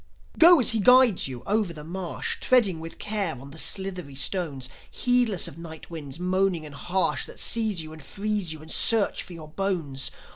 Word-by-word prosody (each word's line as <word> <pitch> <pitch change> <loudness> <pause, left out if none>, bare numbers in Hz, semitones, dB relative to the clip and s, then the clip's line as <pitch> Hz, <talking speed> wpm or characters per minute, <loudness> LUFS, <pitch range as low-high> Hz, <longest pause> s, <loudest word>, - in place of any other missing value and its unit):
Go 340 0 +8
as 250 - +5
he 225 - 0
guides 250 - +5
you, 125 -2 -8
over 205 -4 0
the 150 -2 -9
marsh, 175 +2 -4
Treading 210 -10 +2
with 165 +1 -9
care 205 -7 -1
on 140 +2 -12
the 160 - -7
slithery 185 -8 -2
stones, 140 -3 -2 0.2
Heedless 245 -6 0
of - - -11
night 160 -1 -10
winds 150 -4 -7
moaning 185 -2 0
and 150 - -10
harsh 180 +6 -1
That - - -8
seize 215 -7 +1
you 155 0 -10
and 160 - -12
freeze 200 +3 -3
you 155 -1 -8
and 160 - -8
search 225 -3 +5
for 180 - -11
your 155 -2 -11
bones. 155 -7 -2
180 Hz, 190 wpm, -25 LUFS, 155-205 Hz, 0.2 s, Go